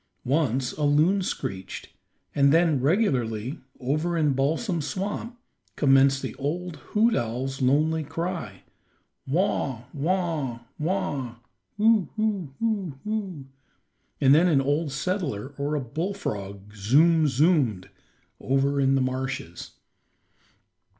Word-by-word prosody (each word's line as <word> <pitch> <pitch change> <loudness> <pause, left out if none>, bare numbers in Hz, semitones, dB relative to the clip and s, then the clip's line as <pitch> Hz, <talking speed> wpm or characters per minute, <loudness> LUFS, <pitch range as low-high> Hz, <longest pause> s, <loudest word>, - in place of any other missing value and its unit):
Once 130 -2 +1
a - - -8
loon 155 +7 +3
screeched, 95 - -5 0.4
and 140 -1 +4
then 160 -4 +3
regularly, 130 - 0 0.2
over 155 +7 -1
in 150 -3 +2
Balsam 160 - 0
Swamp, 200 - -4 0.4
commenced 135 -1 +4
the - - -4
old 165 +4 -3
hoot 225 +2 +1
owl's 130 +4 -2
lonely 155 +5 +2
cry, 165 - -5 0.6
"Waugh, 135 - 0
waugh, 155 -6 -1 0.2
waugh, 145 -7 -2 0.4
hu, 215 -2 +4
hu 210 -7 -1
hu, 205 -9 -1
hu," 195 -9 -4 0.7
and 135 -1 +6
then 165 +4 +5
an 155 -6 +4
old 145 +3 0
settler 145 - -2
or 145 +2 -1
a - - +1
bullfrog 115 - -5
"zoom, 155 +10 +4
zoom'd," 135 - +2 0.5
over 140 +1 +1
in 135 0 +3
the 135 - +2
marshes. 130 -9 -4
145 Hz, 110 wpm, -26 LUFS, 130-175 Hz, 0.7 s, and